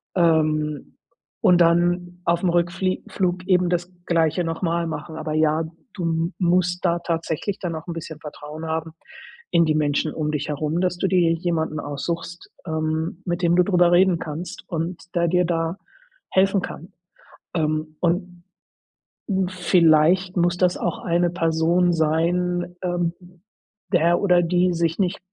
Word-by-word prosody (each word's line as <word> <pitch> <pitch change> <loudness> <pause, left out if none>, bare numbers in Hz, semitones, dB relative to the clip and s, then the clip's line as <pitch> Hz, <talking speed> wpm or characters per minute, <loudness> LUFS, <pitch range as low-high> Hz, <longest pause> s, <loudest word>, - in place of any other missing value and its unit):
Ähm, 155 -4 +1 0.4
und 175 -1 +5
dann 175 +1 +2
auf 170 0 +2
'm 180 - +3
Rückflieg 175 +2 0
Flug 185 -1 -1
eben 180 -2 +3
das 175 +1 -1 0.2
Gleiche 165 0 +2
noch 165 +2 -4
mal 170 -1 0
machen, 160 0 -6
aber 155 -1 -4
ja, 155 +1 +2 0.3
du 165 -1 -1
musst 180 0 +1
da 170 -1 +2
tatsächlich 170 +3 -3
dann 175 -3 -3
noch 160 +2 -7
'n 170 - -3
bisschen 160 -1 -7
Vertrauen 150 +1 -8
haben 160 0 -3 0.6
in 170 -1 +4
die 155 - +2
Menschen 150 0 0
um 150 -1 -2
dich 150 0 -3
herum, 155 +4 -1
dass 180 -1 0
du 190 - 0
dir 175 -3 +3
jemanden 160 -2 -1
aussuchst, 165 +4 -5 0.2
ähm, 160 +2 -2
mit 175 0 -2
dem 170 -1 +3
du 180 - +5
drüber 180 -2 +3
reden 180 -1 +4
kannst 160 +3 -6
und 170 +1 -3
der 170 0 +2
dir 180 +1 +2
da 165 +1 -1 0.5
helfen 195 0 +3
kann. 170 - -8 0.6
Ähm, 155 -1 -1
und 175 0 -1 1.1
vielleicht 180 0 +3
muss 175 0 +2
das 180 -1 +2
auch 175 - -2
eine 175 0 +1
Person 170 +1 +2
sein, 175 +3 0
ähm, 175 -2 0 0.8
der 170 0 +3
oder 180 -3 +4
die 180 +1 +2
sich 165 -1 0
nicht 185 -2 0
170 Hz, 150 wpm, -23 LUFS, 160-180 Hz, 1.1 s, und